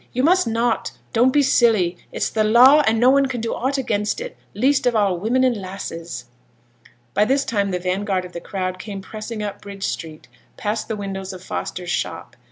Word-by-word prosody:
you 255 Hz, -, 0 dB
must 355 Hz, -2 st, +4 dB
not. 230 Hz, 0 st, 0 dB, 0.2 s
Don't 245 Hz, +2 st, +4 dB
be 290 Hz, +1 st, +4 dB
silly; 220 Hz, -9 st, +3 dB, 0.2 s
it's -, -, -2 dB
the 220 Hz, -, +1 dB
law, 250 Hz, +7 st, +7 dB
and 220 Hz, 0 st, +3 dB
no 250 Hz, +2 st, +6 dB
one 275 Hz, 0 st, +4 dB
can 255 Hz, -2 st, -4 dB
do 230 Hz, 0 st, -2 dB
aught 265 Hz, +3 st, -1 dB
against 210 Hz, -, -1 dB
it, -, -, -6 dB, 0.2 s
least 260 Hz, +3 st, +2 dB
of 240 Hz, -, +2 dB
all 200 Hz, -5 st, +2 dB
women 240 Hz, +7 st, +1 dB
and 255 Hz, -2 st, +3 dB
lasses. 170 Hz, -, -6 dB, 0.9 s
By 205 Hz, -, +4 dB
this 275 Hz, +4 st, +1 dB
time 200 Hz, -3 st, 0 dB
the 180 Hz, -, -1 dB
vanguard 185 Hz, +1 st, -1 dB
of 180 Hz, -, -11 dB
the 170 Hz, -, -6 dB
crowd 185 Hz, -1 st, -4 dB
came 195 Hz, -1 st, -6 dB
pressing 215 Hz, +2 st, -6 dB
up 205 Hz, -1 st, -5 dB
Bridge 200 Hz, -1 st, -8 dB
Street, 155 Hz, -2 st, -5 dB, 0.3 s
past 215 Hz, +1 st, -2 dB
the 220 Hz, -, -2 dB
windows 195 Hz, -2 st, -5 dB
of 185 Hz, -1 st, -10 dB
Foster's 180 Hz, -1 st, -4 dB
shop. -, -, -3 dB
215 Hz, 200 wpm, -21 LUFS, 190-245 Hz, 0.9 s, law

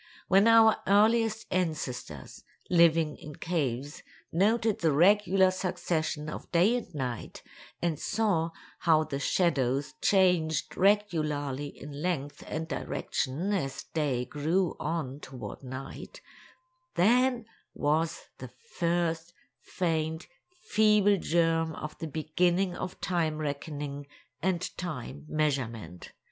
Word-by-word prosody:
When 195 Hz, +4 st, +5 dB
our 225 Hz, -1 st, +7 dB
earliest 220 Hz, +2 st, +3 dB
ancestors, 150 Hz, -, -3 dB, 0.3 s
living 165 Hz, -3 st, +4 dB
in 150 Hz, -1 st, -10 dB
caves, 145 Hz, -5 st, -2 dB, 0.3 s
noted 220 Hz, +4 st, +2 dB
the 160 Hz, -2 st, +2 dB
regular 190 Hz, +3 st, +4 dB
succession 175 Hz, -5 st, -2 dB
of 155 Hz, -, -7 dB
day 180 Hz, +8 st, +4 dB
and 245 Hz, -, -4 dB
night, 125 Hz, -4 st, -5 dB, 0.4 s
and 165 Hz, -4 st, 0 dB
saw 205 Hz, -7 st, 0 dB, 0.3 s
how 160 Hz, -2 st, +4 dB
the 140 Hz, -3 st, -4 dB
shadows 140 Hz, -5 st, +1 dB
changed 180 Hz, -5 st, +2 dB
regularly 155 Hz, -9 st, +1 dB
in 145 Hz, 0 st, -9 dB
length 145 Hz, -5 st, -3 dB
and 160 Hz, +1 st, -3 dB
direction 155 Hz, +4 st, -2 dB
as 135 Hz, -9 st, -2 dB
day 140 Hz, -6 st, 0 dB
grew 160 Hz, +7 st, 0 dB
on 150 Hz, -5 st, -3 dB
toward 130 Hz, -3 st, -8 dB
night, 130 Hz, 0 st, -8 dB, 0.8 s
then 245 Hz, +4 st, +3 dB, 0.3 s
was 155 Hz, +3 st, 0 dB, 0.2 s
the -, -, -7 dB, 0.2 s
first, 170 Hz, 0 st, -1 dB, 0.2 s
faint, 160 Hz, -2 st, -2 dB, 0.4 s
feeble 210 Hz, -2 st, +4 dB
germ 165 Hz, -2 st, +1 dB
of 150 Hz, -, -6 dB
the 165 Hz, -, -4 dB
beginning 175 Hz, +4 st, 0 dB
of 185 Hz, -, -6 dB
time 165 Hz, -4 st, 0 dB
reckoning 145 Hz, -1 st, -4 dB, 0.3 s
and 180 Hz, 0 st, -1 dB
time 150 Hz, -3 st, -6 dB
measurement. 120 Hz, -, -2 dB
165 Hz, 110 wpm, -29 LUFS, 145-185 Hz, 0.8 s, our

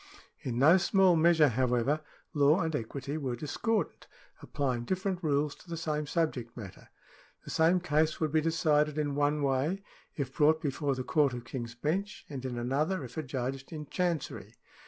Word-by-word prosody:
In 120 Hz, -2 st, -3 dB
no 155 Hz, +8 st, +7 dB
small 190 Hz, -1 st, +4 dB
measure, 160 Hz, -2 st, +5 dB
however, 125 Hz, +4 st, +1 dB, 0.3 s
law 150 Hz, +4 st, +4 dB
and 160 Hz, -2 st, -1 dB
equity 140 Hz, +4 st, -4 dB
were 130 Hz, -4 st, -2 dB
discordant, 200 Hz, -, -2 dB, 0.3 s
applying 130 Hz, -4 st, -2 dB
different 185 Hz, +4 st, -2 dB
rules 145 Hz, -1 st, +1 dB
to 180 Hz, -, -18 dB
the 165 Hz, -, -4 dB
same 150 Hz, -2 st, -2 dB
subject 135 Hz, -8 st, -2 dB
matter. 100 Hz, -5 st, -10 dB, 0.6 s
The -, -, -7 dB
same 165 Hz, +3 st, +4 dB
case 155 Hz, -2 st, +1 dB
would 155 Hz, -2 st, 0 dB
be 155 Hz, 0 st, +3 dB
decided 155 Hz, -2 st, +2 dB
in 145 Hz, -2 st, 0 dB
one 145 Hz, +1 st, +1 dB
way, 140 Hz, +8 st, 0 dB, 0.3 s
if 135 Hz, -3 st, -3 dB
brought 155 Hz, +1 st, +4 dB
before 140 Hz, -1 st, -1 dB
the 130 Hz, -, -3 dB
Court 140 Hz, 0 st, +2 dB
of 120 Hz, -1 st, -7 dB
King's 120 Hz, -1 st, -6 dB
Bench, 175 Hz, +11 st, -2 dB
and 135 Hz, -3 st, -5 dB
in 125 Hz, -2 st, -4 dB
another, 145 Hz, +8 st, 0 dB
if 125 Hz, -1 st, -9 dB
adjudged 135 Hz, -2 st, -4 dB
in 155 Hz, -2 st, -6 dB
Chancery. 175 Hz, -5 st, -2 dB
150 Hz, 170 wpm, -30 LUFS, 130-160 Hz, 0.6 s, no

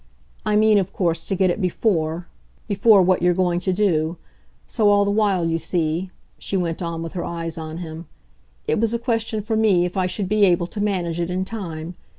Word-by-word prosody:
I 210 Hz, -, +2 dB
mean, 215 Hz, -1 st, +5 dB
of 195 Hz, 0 st, -3 dB
course, 170 Hz, -3 st, -1 dB
to 195 Hz, -, -1 dB
get 185 Hz, -1 st, +2 dB
it 205 Hz, -, -3 dB
BEFORE 175 Hz, -3 st, 0 dB, 0.4 s
before 205 Hz, -1 st, +5 dB
what 185 Hz, 0 st, +2 dB
you're 175 Hz, 0 st, +3 dB
going 175 Hz, -1 st, +1 dB
to 185 Hz, +1 st, -1 dB
do. 175 Hz, -4 st, +1 dB, 0.5 s
So, 210 Hz, -2 st, +2 dB
all 205 Hz, 0 st, +4 dB
the 200 Hz, -, +1 dB
while, 200 Hz, -4 st, +2 dB
you 165 Hz, 0 st, 0 dB
see," 170 Hz, +2 st, -1 dB, 0.3 s
she 195 Hz, -, -2 dB
went 170 Hz, -2 st, -2 dB
on 165 Hz, -1 st, -3 dB
with 165 Hz, -, -7 dB
her 175 Hz, -, -3 dB
eyes 165 Hz, -1 st, -4 dB
on 160 Hz, 0 st, -6 dB
him, 165 Hz, -1 st, -7 dB, 0.6 s
"it -, -, +1 dB
was 230 Hz, +1 st, +1 dB
a -, -, +1 dB
question 225 Hz, -2 st, -1 dB
for 220 Hz, +2 st, -1 dB
me 205 Hz, -5 st, +3 dB
if 180 Hz, -, -5 dB
I 185 Hz, -1 st, +1 dB
should 185 Hz, +1 st, -2 dB
be 210 Hz, +1 st, +2 dB
able 175 Hz, -2 st, +2 dB
to 205 Hz, +4 st, -5 dB
manage 180 Hz, -5 st, -1 dB
it 170 Hz, 0 st, -1 dB
in 185 Hz, +1 st, -1 dB
time. 175 Hz, -6 st, -6 dB
180 Hz, 215 wpm, -22 LUFS, 170-205 Hz, 0.6 s, mean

